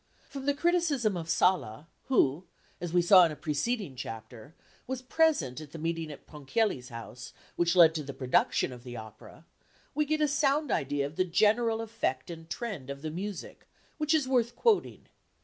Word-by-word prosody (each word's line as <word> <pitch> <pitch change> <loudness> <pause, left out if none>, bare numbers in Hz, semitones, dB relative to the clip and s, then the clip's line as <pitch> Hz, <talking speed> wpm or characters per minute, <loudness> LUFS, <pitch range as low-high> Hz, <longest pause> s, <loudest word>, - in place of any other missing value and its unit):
From 275 -1 -7
the 285 - +3
criticism 300 - +1
of 165 -2 -5
Sala, 155 -7 +1 0.2
who, 175 - +2 0.4
as 175 -2 -4
we 175 0 +3
saw 185 +1 +8
in 165 - +2
a - - -6
preceding 165 - -2
chapter, 115 +4 -9 0.3
was 260 0 -4
present 255 - +1
at 150 -2 -12
the - - -6
meeting 165 0 -3
at 145 - -12
Ponchielli's 145 - -2
house 115 +1 -9 0.2
which 175 +1 +1
led 165 -3 +7
to 160 - -2
the 140 - -6
production 130 -1 +1
of 120 -1 -12
the 120 -1 -8
opera, 110 +8 -12 0.5
we 300 - +1
get 310 +1 0
a 300 - +3
sound 290 +1 +1
idea 140 0 0
of 145 +2 -8
the - - +3
general 220 +5 +2
effect 180 - -3
and 165 -1 -10
trend 190 - -5
of 140 +1 -7
the 155 - -3
music, 195 +3 -7 0.3
which 305 +1 +2
is 295 -4 +1
worth 240 -2 +1
quoting. 455 -4 +1
175 Hz, 185 wpm, -29 LUFS, -, 0.5 s, saw